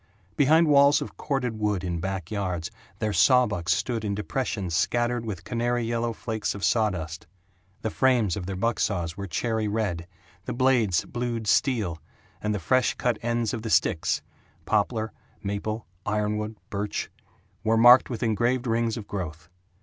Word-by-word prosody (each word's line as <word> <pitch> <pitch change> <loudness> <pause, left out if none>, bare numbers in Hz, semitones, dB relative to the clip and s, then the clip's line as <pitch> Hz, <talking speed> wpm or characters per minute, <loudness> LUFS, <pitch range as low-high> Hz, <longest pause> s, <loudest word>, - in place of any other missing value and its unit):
Behind 155 +6 +5
walls 140 -1 +6
of - - -7
corded 125 -6 -2
wood 105 -3 0
in 85 -2 -2
back 95 0 -4
yards 90 -5 -2 0.3
their 110 -1 -1
sawbucks 100 -4 +3
stood 115 -3 -2
in 100 -1 -1
depressions 105 -4 -3
scattered 120 +4 +1
with 100 -7 -5
canary 120 +2 -1
yellow 115 0 -1
flakes 110 -2 -3
of 100 - -2
sawdust. 90 -9 0 0.6
The 110 - -1
frames 120 -8 +2
of 90 -3 -5
their 95 - -3
buck 115 +4 0
saws 85 -4 -1
were 100 0 -5
cherry 110 +7 -1
red, 100 -6 -2 0.4
the - - -3
blades 120 -7 +2
blued 120 -2 -3
steel, 105 - +1 0.4
and 105 - -1
the 105 - 0
fresh 125 +10 +2
cut 120 -3 0
ends 120 0 0
of 115 - -3
the 110 - -4
sticks - - +2 0.4
poplar, 110 +1 0 0.3
maple, 105 +2 -3 0.2
iron 105 0 0
wood, 105 +1 -4 0.2
birch 105 0 -3 0.5
were 110 +1 +3
marked 120 +3 +8
with 120 -3 -4
engraved 120 +3 +1
rings 115 -1 0
of 110 - -6
growth. 80 -4 -6
110 Hz, 160 wpm, -26 LUFS, 100-120 Hz, 0.6 s, marked